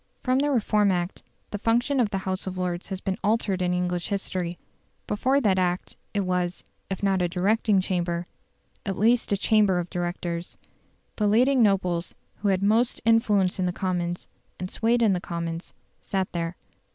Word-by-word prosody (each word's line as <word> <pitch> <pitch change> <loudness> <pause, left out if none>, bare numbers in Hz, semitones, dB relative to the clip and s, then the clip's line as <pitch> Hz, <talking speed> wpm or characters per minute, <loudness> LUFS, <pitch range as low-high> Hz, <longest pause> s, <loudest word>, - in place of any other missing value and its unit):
From 255 0 +2
the 290 +1 +2
Reform 210 -6 +3
Act 175 0 -2 0.3
the 205 - -3
function 240 +6 +2
of 230 -4 +3
the 200 - -2
House 185 0 -2
of 185 0 -4
Lords 180 -1 -2
has 190 -1 -4
been 195 +2 -2
altered 210 -3 +1
in 180 0 +1
English 180 -1 -1
history. 185 -3 -2 0.5
Before 260 +7 +2
that 200 -7 +2
Act 180 0 -1 0.2
it 205 - 0
was, 180 -1 -1 0.3
if 190 0 -4
not 195 -2 +2
a 175 - +1
directing 200 +3 +2
Chamber, 175 -2 -1 0.6
at 195 -2 -3
least 230 +2 +3
a 200 - +3
Chamber 205 -2 +3
of 175 0 -3
Directors. 175 -1 -3 0.6
The 210 - +2
leading 250 +5 +4
nobles, 185 -5 +1 0.2
who 210 - -2
had 195 -1 +2
most 225 +4 +2
influence 210 -5 +3
in 185 - +1
the - - +1
Commons, 175 -2 -2 0.3
and 185 +1 -5
swayed 235 +1 +2
the 195 -6 +3
Commons, 170 -1 -4 0.3
sat 190 -2 -2
there. 170 0 -2
190 Hz, 175 wpm, -26 LUFS, 180-215 Hz, 0.6 s, leading